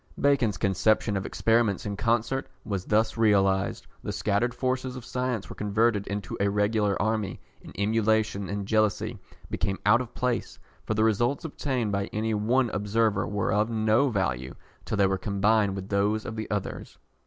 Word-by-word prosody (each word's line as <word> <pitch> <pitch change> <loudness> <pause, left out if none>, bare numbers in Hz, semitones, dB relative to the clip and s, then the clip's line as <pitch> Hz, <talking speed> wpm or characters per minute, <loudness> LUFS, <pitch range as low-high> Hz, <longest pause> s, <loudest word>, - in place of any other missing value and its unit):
Bacon's 130 -8 +2
conception 100 +3 +2
of 95 - -2
"Experiments 115 -3 +1
in 100 -1 -3
concert" 115 +4 0 0.2
was 100 -3 -3
thus 110 +2 +1
realised, 100 -3 +2 0.2
the - - -4
scattered 105 +4 0
forces 130 0 -2
of 125 -2 -8
science 125 -5 -2
were - - -9
converted 105 0 +1
into 100 -1 -4
a 100 0 +2
regular 105 0 +1
army, 110 -3 -1 0.2
and - - -11
emulation 110 -1 +1
and 100 -1 -3
jealousy 110 -1 +1 0.3
became 95 0 -1
out 115 +4 +5
of 125 - -8
place, 125 -1 -2 0.3
for 110 - 0
the 110 - +2
results 120 +7 +1
obtained 130 -7 -2
by 100 0 0
any 110 +2 -2
one 115 +3 +1
observer 105 -1 +1
were 105 -2 -1
of 105 +2 +2
no 110 +4 +2
value 70 - -2 0.3
till - - -2
they 100 - +4
were 95 0 0
combined 100 0 +2
with 95 0 -6
those 105 +2 +1
of 110 - -5
the 110 -1 -5
others. 105 -2 -4
105 Hz, 170 wpm, -27 LUFS, 100-115 Hz, 0.3 s, out